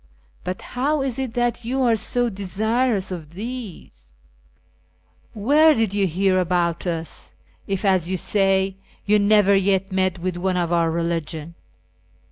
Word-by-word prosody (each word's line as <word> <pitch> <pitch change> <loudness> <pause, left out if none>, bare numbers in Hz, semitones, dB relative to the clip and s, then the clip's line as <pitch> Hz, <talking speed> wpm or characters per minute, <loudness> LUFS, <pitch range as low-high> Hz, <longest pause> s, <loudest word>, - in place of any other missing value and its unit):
I'.ut 185 - -3
how 280 +3 -1
is 265 -2 -3
it 260 -4 -4
that 240 0 0
you 260 +3 -1
are 235 -2 +3
so 245 +3 0
desirous 210 +1 -1
of 165 -3 -8
these? 200 - -8 1.2
Where 295 +9 +4
did 225 -4 0
you 200 -1 +1
hear 185 +2 +1
about 175 -1 0
us, 165 -1 -5 0.3
if, 195 +1 -2
as 185 -3 +2
you 185 - -1
say, 195 0 +1 0.3
you 210 +1 +4
never 205 -1 +4
yet 195 0 +1
met 185 -1 0
with 180 0 -3
one 185 +1 -1
of 175 -1 0
our 170 -1 +2
religion 165 -1 -3
195 Hz, 145 wpm, -22 LUFS, 175-225 Hz, 1.2 s, Where